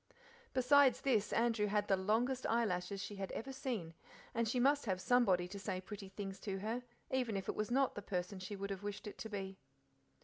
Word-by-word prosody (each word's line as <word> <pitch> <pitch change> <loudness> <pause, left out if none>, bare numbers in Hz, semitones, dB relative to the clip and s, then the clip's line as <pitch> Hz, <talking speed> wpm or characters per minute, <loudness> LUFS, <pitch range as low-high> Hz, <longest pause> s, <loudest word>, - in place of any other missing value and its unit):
Besides 265 +1 +6
this 220 -7 +2
Andrew 230 -2 +2
had 205 0 +1
the 195 - +4
longest 225 +7 +1
eyelashes 200 -4 0
she 205 +1 -6
had 195 -1 -4
ever 270 +4 -4
seen 240 - -3 0.4
and 230 0 +1
she 250 - +1
must 280 0 +3
have 185 -2 +1
somebody 190 -6 +4
to 200 +1 -6
say 190 -2 -2
pretty 195 +1 -8
things 195 0 -6
to 195 -2 -3
her, 220 +5 -2 0.3
even 245 -5 +1
if 195 - -4
it - - 0
was 215 +1 -1
not 265 +2 +3
the 205 - -5
person 185 0 -3
she 195 +3 -5
would 200 0 -4
have 195 -1 -4
wished 205 -1 -5
it 210 - -7
to 220 - -5
be. 195 -2 -5
210 Hz, 210 wpm, -37 LUFS, 195-240 Hz, 0.4 s, Besides